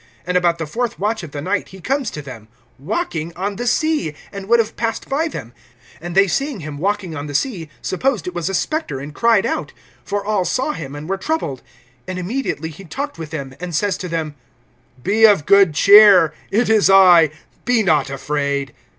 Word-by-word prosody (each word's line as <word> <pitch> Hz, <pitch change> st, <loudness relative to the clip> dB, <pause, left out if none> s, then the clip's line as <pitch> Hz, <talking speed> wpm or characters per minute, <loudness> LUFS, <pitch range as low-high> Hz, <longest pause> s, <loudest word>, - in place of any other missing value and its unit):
And 180 Hz, +1 st, -2 dB
about 175 Hz, -2 st, +2 dB
the 165 Hz, -, -4 dB
fourth 230 Hz, +8 st, -3 dB
watch 215 Hz, +2 st, -1 dB
of 170 Hz, -, -8 dB
the 145 Hz, 0 st, -6 dB
night 190 Hz, +2 st, -1 dB
he 190 Hz, -, -13 dB
comes 270 Hz, +3 st, -1 dB
to 150 Hz, -, -8 dB
them, 115 Hz, -6 st, -10 dB, 0.3 s
walking 165 Hz, -, -3 dB
on 195 Hz, +2 st, -3 dB
the 245 Hz, -, -3 dB
sea, 300 Hz, -, 0 dB, 0.2 s
and 195 Hz, -1 st, -8 dB
would 235 Hz, -, +6 dB
have 225 Hz, -2 st, -1 dB
passed 225 Hz, -1 st, -3 dB
by 300 Hz, +4 st, 0 dB
them. 120 Hz, -, -8 dB, 0.5 s
(49)And 175 Hz, +1 st, -6 dB
they 195 Hz, +1 st, +5 dB
seeing 275 Hz, -, -2 dB
him 145 Hz, -1 st, -7 dB
walking 195 Hz, -2 st, -2 dB
on 145 Hz, 0 st, -5 dB
the 145 Hz, -, -6 dB
sea, 175 Hz, -, -2 dB
supposed 245 Hz, +4 st, -1 dB
it 180 Hz, -, -5 dB
was 175 Hz, +1 st, -2 dB
a 195 Hz, -, -2 dB
spectre, 310 Hz, -, -2 dB
and 145 Hz, +2 st, -8 dB
cried 230 Hz, +2 st, +3 dB
out; -, -, -3 dB, 0.3 s
(50)for 200 Hz, 0 st, -2 dB
all 210 Hz, -3 st, +1 dB
saw 260 Hz, +10 st, -1 dB
him, 145 Hz, -, -7 dB
and 150 Hz, +1 st, -8 dB
were 195 Hz, +1 st, -1 dB
troubled. 190 Hz, -, -2 dB, 0.5 s
And 185 Hz, -, -4 dB
immediately 180 Hz, -, -3 dB
he 165 Hz, +6 st, -12 dB
talked 280 Hz, -, -6 dB
with 160 Hz, -2 st, -6 dB
them, 140 Hz, -4 st, -6 dB
and 175 Hz, -2 st, -5 dB
says 200 Hz, +5 st, +1 dB
to 180 Hz, -, -6 dB
them: 160 Hz, -2 st, -3 dB, 0.7 s
Be 220 Hz, +3 st, +4 dB
of 200 Hz, -9 st, +4 dB
good 200 Hz, -6 st, +5 dB
cheer; 200 Hz, -3 st, +7 dB, 0.2 s
it 225 Hz, +5 st, +1 dB
is 220 Hz, -3 st, +4 dB
I, 180 Hz, -5 st, +7 dB, 0.3 s
be 245 Hz, -3 st, +2 dB
not 155 Hz, -8 st, +2 dB
afraid. 140 Hz, -1 st, -2 dB
185 Hz, 205 wpm, -19 LUFS, 155-220 Hz, 0.7 s, cheer